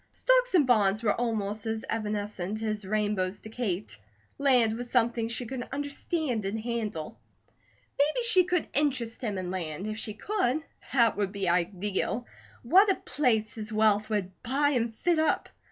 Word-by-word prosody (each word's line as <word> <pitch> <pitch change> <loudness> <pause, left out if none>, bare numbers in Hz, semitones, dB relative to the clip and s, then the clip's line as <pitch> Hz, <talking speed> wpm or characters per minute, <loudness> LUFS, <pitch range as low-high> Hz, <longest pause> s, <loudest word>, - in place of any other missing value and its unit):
Stocks - - +2
and 310 -6 +5
bonds 215 -3 +3
were 210 - +3
almost 220 -2 -2
as 220 0 -2
evanescent 210 -1 -3
as 215 -2 -2
rainbows 205 -2 -1
to 220 - -10
Kate. 205 - -3 0.4
Land 250 -6 +4
was 245 +1 -5
something 235 -2 +1
she 235 +2 -3
could 255 +2 -5
understand 285 -3 -2
and 200 +3 -2
handle. 215 -8 -4 0.8
Maybe 305 +12 +2
she 385 -6 +6
could 360 -2 0
interest 260 -6 0
him 210 -6 -2
in 180 -1 -3
land; 180 -1 -4
if 215 +1 -4
she 215 -2 -4
could, 315 - -1 0.3
that 235 -6 +3
would 200 -2 0
be 195 -2 -2
ideal. 190 +6 0 0.4
What 375 - +6
a 385 - +4
place 225 -6 0
his 215 -3 -6
wealth 215 0 +2
would 205 -4 -1
buy 275 +4 +1
and 235 -5 0
fit 340 +6 +1
up. 315 - +1
225 Hz, 165 wpm, -28 LUFS, 205-260 Hz, 0.8 s, she